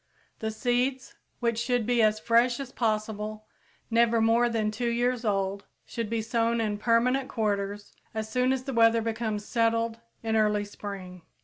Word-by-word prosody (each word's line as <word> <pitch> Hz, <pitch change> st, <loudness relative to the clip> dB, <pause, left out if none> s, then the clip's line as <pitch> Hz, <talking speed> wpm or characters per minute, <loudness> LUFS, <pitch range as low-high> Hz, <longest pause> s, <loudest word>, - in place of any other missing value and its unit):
_ -, -, -41 dB
The 220 Hz, -, -2 dB
seeds, 245 Hz, +3 st, -1 dB, 0.3 s
which 235 Hz, -1 st, +1 dB
should 245 Hz, -1 st, 0 dB
be 240 Hz, 0 st, +2 dB
as 215 Hz, 0 st, +3 dB
fresh 235 Hz, +2 st, +3 dB
as 270 Hz, -2 st, -6 dB
possible, 215 Hz, -2 st, -2 dB, 0.5 s
never 230 Hz, 0 st, +4 dB
more 230 Hz, +2 st, +3 dB
than 220 Hz, -2 st, 0 dB
two 235 Hz, +3 st, -2 dB
years 245 Hz, +1 st, 0 dB
old, 200 Hz, -2 st, -1 dB, 0.2 s
should 230 Hz, -3 st, -4 dB
be 225 Hz, -1 st, -1 dB
sown 230 Hz, 0 st, +1 dB
in 210 Hz, -2 st, -1 dB
permanent 250 Hz, +4 st, +2 dB
quarters 205 Hz, -2 st, -2 dB, 0.2 s
as 220 Hz, 0 st, -2 dB
soon 250 Hz, +3 st, +1 dB
as 265 Hz, -1 st, -1 dB
the 270 Hz, -, -4 dB
weather 230 Hz, -1 st, +4 dB
becomes 220 Hz, -2 st, -2 dB
settled 230 Hz, -1 st, +1 dB, 0.2 s
in 220 Hz, -1 st, 0 dB
early 210 Hz, -1 st, +2 dB
spring. 195 Hz, -3 st, -8 dB
230 Hz, 170 wpm, -27 LUFS, 215-235 Hz, 0.5 s, never